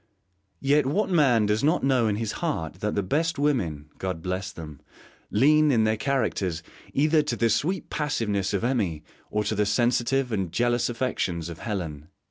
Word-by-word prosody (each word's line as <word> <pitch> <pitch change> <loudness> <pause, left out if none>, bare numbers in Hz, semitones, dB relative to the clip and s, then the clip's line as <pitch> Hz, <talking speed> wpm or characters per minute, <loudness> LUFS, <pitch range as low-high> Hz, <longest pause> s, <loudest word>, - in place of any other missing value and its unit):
Yet 145 0 +3
what 195 +8 0
man 135 -10 +4
does 105 +3 0
not 160 +5 +2
know 130 -4 +3
in 105 - +1
his 110 0 -2
heart 95 - -3
that 105 +1 -2
the 100 - 0
best 160 - 0
women 110 - 0
God 90 -3 -4
bless 95 +2 -3
them 75 -6 -9 0.5
lean, 150 +6 +4
in 115 -4 +3
their 110 0 +2
characters, 105 - -1 0.3
either 155 +2 +4
to 150 - -2
the 115 -1 +2
sweet 160 - -1
passiveness 105 -10 -1
of 100 +1 -1
Emmy 100 - 0 0.3
or 105 0 0
to 105 - -1
the 105 -1 +1
sensitive 120 +4 +1
and 95 -6 -1
jealous 120 +2 +1
affections 95 -9 -2
of 85 - -8
Helen? 80 -9 -4
115 Hz, 175 wpm, -26 LUFS, 95-140 Hz, 0.5 s, man